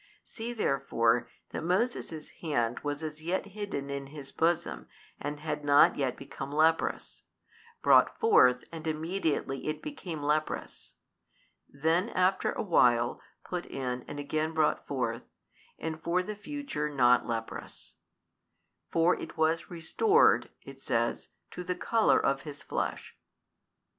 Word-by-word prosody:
See 230 +1 -6
therefore 130 - +1 0.2
that - - -4
Moses' 180 -4 -1
hand 125 -7 0
was 145 +1 -4
as 155 0 -6
yet 175 +5 -1
hidden 200 -9 -5
in 140 0 -4
his 140 -1 -10
bosom 170 +1 0 0.3
and 145 +1 -4
had 155 -1 -3
not 145 0 +6
yet 130 -3 -1
become 135 0 -7
leprous; 160 +2 +1 0.6
brought - - +5
forth 125 - +5
and 160 -1 -7
immediately 160 -4 -2
it 155 0 -3
became 175 - -6
leprous; 150 +1 -2 0.8
then 165 +8 +1
after 185 -1 +2
a - - -3
while 120 - +3 0.2
put 180 -1 -4
in 125 -2 -3
and 145 - -6
again 155 +2 -1
brought 155 -1 +1
forth, - - -3 0.5
and 160 0 -5
for 175 +2 +1
the 215 +3 -5
future 240 - -4
not 125 -4 +4
leprous; 115 -1 -6 1.0
for 165 +2 +3
it - - -8
was 160 +1 +1
restored 400 - +3
(it - - -12
says) - - -1 0.2
to 180 - -6
the 180 +1 -2
colour 225 +4 +3
of 135 -1 +1
his 145 -1 -9
flesh. - - -3
155 Hz, 135 wpm, -30 LUFS, 140-180 Hz, 1.0 s, not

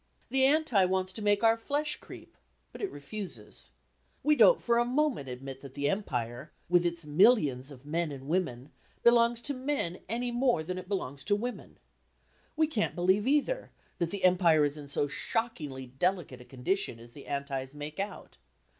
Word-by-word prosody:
The 265 0 +4
Anti 275 -8 +4
wants 185 0 0
to 220 - -6
make 205 +1 +2
our 225 0 +6
flesh 290 +6 -1
creep; - - -13 0.4
but - - -10
it 400 - -1
refuses. 145 - -7 0.5
We 300 +2 +4
don't - - +7
for 235 0 +2
a - - +4
moment 255 - 0
admit 135 +1 -7
that 135 -2 -11
the 140 0 0
Empire, 125 - -3 0.2
with 175 0 +4
its 170 -2 -4
millions 150 - +4
of 140 -1 -12
men 160 +1 -1
and 135 -1 -8
women, 150 -6 -1 0.3
belongs 235 0 +5
to 285 - +1
men 255 -10 -2
any 240 +2 -1
more 240 -8 +2
than 180 +3 -4
it 180 +1 -11
belongs 140 -9 -3
to 205 - +3
women. 245 +4 -5 0.8
We 315 0 +4
can't 240 -9 -1
believe, 190 +5 +2
either, 300 - +1 0.3
that 170 - 0
the 200 +1 -5
Empire 175 -4 +5
is 145 0 -2
in 145 -2 -9
so 145 +1 0
shockingly 145 - -3
delicate 135 0 -2
a - - -13
condition 130 +1 -2
as 120 +1 -14
the 140 - -13
Antis 140 -1 -3
make 150 +3 -7
out. 200 +1 -5
180 Hz, 180 wpm, -30 LUFS, 140-235 Hz, 0.8 s, don't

